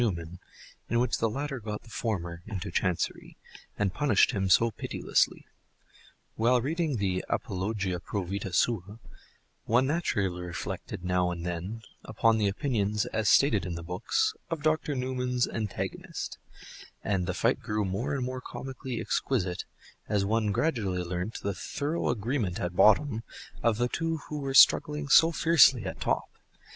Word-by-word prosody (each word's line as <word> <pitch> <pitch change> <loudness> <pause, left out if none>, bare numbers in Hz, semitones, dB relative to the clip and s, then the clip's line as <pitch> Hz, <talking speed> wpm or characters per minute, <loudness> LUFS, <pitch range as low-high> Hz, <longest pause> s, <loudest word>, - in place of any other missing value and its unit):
Newman, 85 -6 -2 0.5
in 115 - +2
which 125 - +1
the 115 - +2
latter 135 +3 -3
got 105 -1 -5
the - - -16
former 85 -8 -3
"into 100 -3 -5
Chancery," 90 0 -2 0.4
and 100 -3 0
punished 140 -9 +3
him 95 -5 -1
so 115 +5 +5
pitilessly. - - 0 0.9
While 120 +3 +3
reading 155 +1 -1
the 95 -3 -1
"Apologia 95 -1 -2
pro 100 +2 -3
Vitâ 95 +1 -4
Sua," 105 -2 0 0.7
one 120 +4 +3
naturally 100 - 0
reflected 90 0 -6
now 90 0 +2
and 85 -1 -5
then 90 +6 -4 0.2
upon 115 -1 +2
the 105 - +2
opinions, 105 -2 0
as 110 -2 0
stated 120 -8 +4
in 90 -2 -4
the 85 - -6
books, 90 +2 0 0.2
of 165 -3 -3
Dr. 155 -1 +1
Newman's 125 -1 0
antagonist; 110 -3 -4 0.6
and 95 -3 0
the 90 - -2
fight - - +2
grew 105 -1 -1
more 115 +10 -2
and 130 -3 -1
more 130 0 -4
comically 130 -2 -6
exquisite 95 -9 -1 0.4
as 100 -2 +1
one 110 0 +1
gradually 100 - 0
learnt 90 +4 -4
the 100 - -1
thorough 145 - -2
agreement 115 -4 -1
at 90 -4 -3
bottom 110 +4 +4 0.4
of 115 -2 +2
the 120 +1 +1
two 165 +4 -1
who 150 - -3
were 135 -1 -3
struggling 150 +1 +6
so 165 +4 +7
fiercely 145 - +5
at 90 - -6
top. - - +1
110 Hz, 150 wpm, -28 LUFS, 95-130 Hz, 0.9 s, so